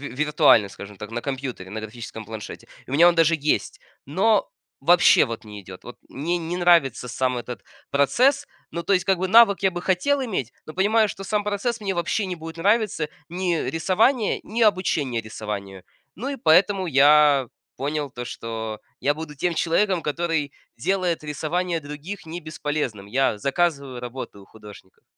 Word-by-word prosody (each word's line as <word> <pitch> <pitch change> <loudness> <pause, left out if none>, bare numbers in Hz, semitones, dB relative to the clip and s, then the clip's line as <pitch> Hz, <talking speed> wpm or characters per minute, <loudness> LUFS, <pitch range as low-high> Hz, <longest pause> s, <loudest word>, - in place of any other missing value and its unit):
виртуально, 150 -7 +4
скажем 100 +1 -11
так, 105 +3 -8
на 120 - -3
компьютере, 130 -8 -5
на 110 +3 -5
графическом 110 0 -8
планшете. 110 -1 -8 0.2
У - - -10
меня 165 +5 +6
он 175 - +4
даже 165 0 +4
есть, 150 +1 -1 0.3
но 200 +9 +2 0.3
вообще 175 0 +6
вот 115 -3 -7
не 105 -1 -9
идет. 95 -1 -12
Вот 120 - -10
мне 170 +6 -2
не 170 +1 -4
нравится 170 -9 +3
сам 125 +1 -1
этот 120 -3 -7 0.3
процесс, 255 - +2 0.2
ну, 170 - -4
то 200 - +1
есть, 185 - +1
как 190 -1 +2
бы, 185 +2 -1
навык 220 -2 +6
я 190 - +3
бы 175 0 -5
хотел 230 +11 +1
иметь, 180 - -3
но 155 - -9
понимаю, 215 +4 +3
что 195 - -7
сам 210 +1 -1
процесс 210 +3 -2
мне 200 -2 -2
вообще 175 +4 -1
не 185 -1 -4
будет 165 0 -9
нравиться, 200 -3 +1 0.2
ни 175 0 -1
рисование, 195 - +1
ни 230 +3 -3
обучение 165 - +1
рисованию. 100 -3 -7 0.3
Ну, 250 +8 -4
и 280 - -3
поэтому 190 -1 +3
я 145 -1 +5 0.3
понял 145 +1 -2
то, 120 -1 -7
что 110 -3 -5 0.2
я 145 - +2
буду 150 0 -8
тем 175 +5 -1
человеком, 180 +3 +1
который 155 -1 -1 0.3
делает 180 -2 -1
рисование 165 +4 -2
других 155 +7 -8
не 165 +2 -6
бесполезным. 150 -9 -4
Я 120 0 +1
заказываю 140 -1 -1
работы 125 -4 -7
у 100 - -15
художников. 105 -3 -15
155 Hz, 170 wpm, -23 LUFS, 125-185 Hz, 0.3 s, меня